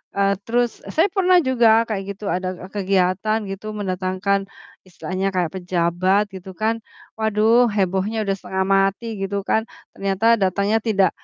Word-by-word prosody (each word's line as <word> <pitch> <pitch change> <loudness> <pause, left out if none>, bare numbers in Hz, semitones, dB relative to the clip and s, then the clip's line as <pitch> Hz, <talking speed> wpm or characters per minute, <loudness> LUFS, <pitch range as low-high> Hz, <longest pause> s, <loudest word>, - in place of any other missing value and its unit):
eee, 200 0 +2
terus, 240 +1 +2 0.2
e - - -7
saya 330 +6 +4
pernah 370 -2 +4
juga 230 -3 +4
kayak 195 -2 -2
gitu, 210 - -10
ada 185 +1 -1 0.2
kegiatan 195 +1 +1
gitu 195 +2 -7
mendatangkan 190 0 -1 0.5
istilahnya 185 +2 -3
kayak 175 -3 0
pejabat 180 +2 +1
gitu 190 0 -9
kan, 220 +3 0 0.4
waduh, 220 +3 +3
hebohnya 195 +2 0
udah 195 -1 -1
setengah 190 +1 -2
mati 195 +4 +1
gitu 195 +1 -2
kan, 220 - +2 0.3
ternyata 195 +2 -2
datangnya 200 +3 +1
tidak 200 -4 +3
195 Hz, 145 wpm, -21 LUFS, 185-220 Hz, 0.5 s, saya